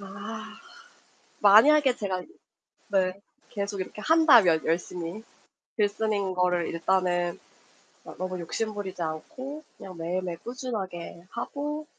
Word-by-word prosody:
아. 215 +3 -8 0.8
만약에 250 +6 +7
제가 190 -3 -2 0.7
네 190 -1 +1 0.3
계속 200 -2 -3
이렇게 210 +3 -7
한다면 240 - +6
열심히 175 +4 -2 0.5
글 210 -2 +4
쓰는 205 -2 -1
거를, 180 -1 +1
일단은 175 0 0 0.7
아 - - -10
너무 185 0 -3
욕심 215 +6 -3
부리지 190 -3 -5
않고 260 - -5
그냥 185 -2 -10
매일매일 175 +1 -2
꾸준하게 195 -9 -6
하고 295 +6 -4
195 Hz, 240 characters per minute, -27 LUFS, 180-225 Hz, 0.8 s, 만약에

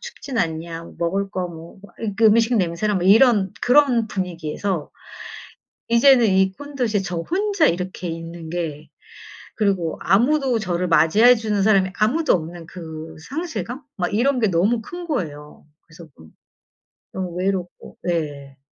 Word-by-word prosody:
춥진 285 - -7
않냐." 165 -2 -3
먹을 195 +4 -1
거 185 -2 -3
뭐 165 +2 -12 0.4
그 225 - +2
음식 230 +2 +4
냄새나 185 +3 0
뭐 185 - -1
이런 205 -1 +5
그런 250 -3 +4
분위기에서 180 -2 -4 1.0
이제는 240 +1 +5
이 190 -1 +3
큰 285 +8 -11
도시에 230 -6 0
저 180 -2 -4
혼자 390 - +1
이렇게 180 +1 -2
있는 165 0 -7
게 160 -3 -4 0.7
그리고 195 -6 0
아무도 250 - +2
저를 180 -3 -1
맞이해 170 +10 +5
주는 215 -3 -1
사람이 195 -3 +3
아무도 285 +10 +2
없는 170 0 -5
그 160 -2 -9
상실감? 280 - -5
막 180 +1 -2
이런 255 +5 +2
게 220 - +3
너무 195 +7 +1
큰 350 +7 -8
거예요. 150 - -5 0.2
그래서 165 +1 -15
너무 80 -1 -16 0.8
너무 185 -2 -4
외롭고. 185 -1 -4
네. 145 -6 -4
190 Hz, 280 characters per minute, -21 LUFS, 170-235 Hz, 1.0 s, 이런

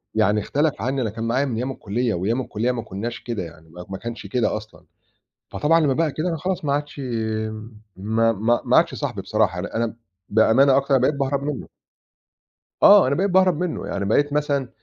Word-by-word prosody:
يعني 105 +2 +3
اختلف 145 +1 -1
عنّي 130 +2 -1
أنا 110 - -1
كان 115 +2 -6
معايا 125 +5 +1
من 125 -4 -3
أيام 130 +3 -2
الكُلّية 115 0 -2
وأيام 110 +9 -1
الكُلّية 120 +1 -1
ما 120 -2 -3
كُنّاش 110 +5 -5
كده 115 -6 -3
يعني 80 -1 -12
ما 90 +2 -10
ما 95 - -5
كانش 115 -2 -7
كده 110 -1 0
أصلًا، 110 0 -13 0.7
فطبعًا 165 +3 +2
لمّا 145 -3 +2
بقى 155 0 0
كده 155 +3 -2
أنا 165 - -1
خلاص 180 +1 -3
ما 140 - +1
عادش 145 0 -3
يم 110 -3 -4 0.2
ما 110 +3 +1
ما 115 +3 +1
ما - - +3
عادش - - +3
صاحبي - - -4
بصراحة، 90 - 0
أنا 100 - -5
أنا 115 +1 +1
م 115 - -8 0.3
بأمانة 125 +5 +4
أكتر 140 0 +2
أنا 130 - +3
بقيت 145 +3 +2
باهرب 140 0 -1
منُّه. 145 -2 -4 1.2
آه، 200 -8 +8
أنا 140 - +1
بقيت 195 +5 +1
باهرب 185 -3 +4
منُّه. 180 -2 -3
يعني 100 0 -3
بقيت 145 +7 +2
مثلًا 145 -3 0
120 Hz, 210 wpm, -22 LUFS, 110-145 Hz, 1.2 s, آه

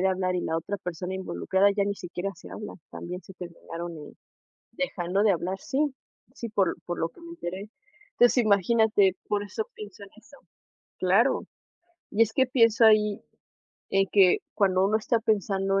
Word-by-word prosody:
de 190 - +3
hablar 185 -1 0
y 180 - 0
la 160 - -2
otra 195 +5 -4
persona 180 0 -5
involucrada 190 +2 +1
ya 200 0 0
ni 200 - -1
siquiera 180 +1 -5
se - - -13
hablan, 210 - -7
también 180 +2 -7
se 190 +2 -14
terminaron, 170 -1 -7
eh, 150 - -11 0.6
dejando 195 -7 -1
de 215 - +4
hablar. 185 +2 -2
Sí, 270 - -3 0.6
sí, 235 - -6
por 195 -4 +2
l - - -2
por 175 - -4
lo 165 - 0
que 170 - -20
me 335 - -10
enteré. 195 - -6 0.4
Entonces, 245 +1 +4
imagínate, 205 -1 +3
por 205 -1 0
eso 210 +2 -4
pienso 205 -1 -10
en 200 - -16
eso. 275 +5 -18 0.6
Claro. 195 +8 +3 0.7
Y 220 - +3
es 220 -1 +1
que 260 +2 +3
pienso 230 -2 +4
ahí 210 -1 +4 0.7
en 195 0 +3
que 190 -3 +6 0.2
cuando 190 -2 +3
uno 215 +2 +3
está 230 +2 +1
pensando 195 -2 +1
195 Hz, 180 wpm, -27 LUFS, 185-215 Hz, 0.7 s, que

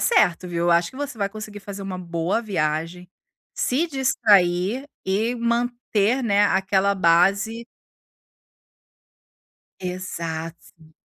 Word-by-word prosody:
certo, 180 - +2
viu. 170 0 -2
Eu 175 - +3
acho 170 0 +3
que 260 - -14
você 285 -5 -5
vai 200 -1 0
conseguir 215 0 -8
fazer 200 0 -8
uma 190 -2 -5
boa 170 +4 -1
viagem, 170 -3 -2 0.5
se 290 +7 0
distrair 230 - +2 0.2
e 215 +6 0
manter, 235 0 0
né, 205 -3 +3
aquela 195 +1 +2
base 195 +6 +2 2.1
Exato. 165 -3 -6
195 Hz, 110 wpm, -23 LUFS, 175-230 Hz, 2.1 s, Eu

